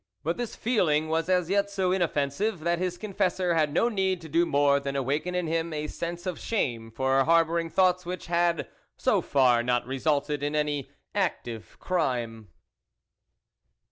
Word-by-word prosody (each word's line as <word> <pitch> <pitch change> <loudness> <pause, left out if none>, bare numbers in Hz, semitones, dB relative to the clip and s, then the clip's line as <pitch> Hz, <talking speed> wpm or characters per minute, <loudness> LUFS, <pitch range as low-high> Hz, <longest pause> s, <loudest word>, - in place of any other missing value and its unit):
But 165 +3 -1
this 240 -2 -4
feeling 160 -10 +1
was 165 +2 0
as 180 -2 +2
yet 200 +2 +1
so 190 -2 0
inoffensive, 175 +2 0
that 170 +1 0
his 180 -1 -2
confessor 190 -3 0
had 155 -3 +2
no 175 +10 +2
need 190 -5 0
to 160 - -10
do 170 +3 +2
more 140 0 +3
than 140 0 -4
awaken 145 +7 -1
in 180 -1 0
him 165 +1 -1
a 150 0 -3
sense 170 +3 -5
of 180 -3 -3
shame 120 - -2
for 130 +3 +2
har 165 +2 +5
bouring 165 0 -2
thoughts 185 -1 +3
which 180 +1 -5
had, 170 -1 +1 0.3
so - - +2
far, 125 -4 +3
not 120 0 0
resulted 145 +2 -1
in 145 +1 -1
any 145 -2 -1 0.2
active 120 - -3
crime. 120 - -2
165 Hz, 170 wpm, -27 LUFS, 140-180 Hz, 0.3 s, har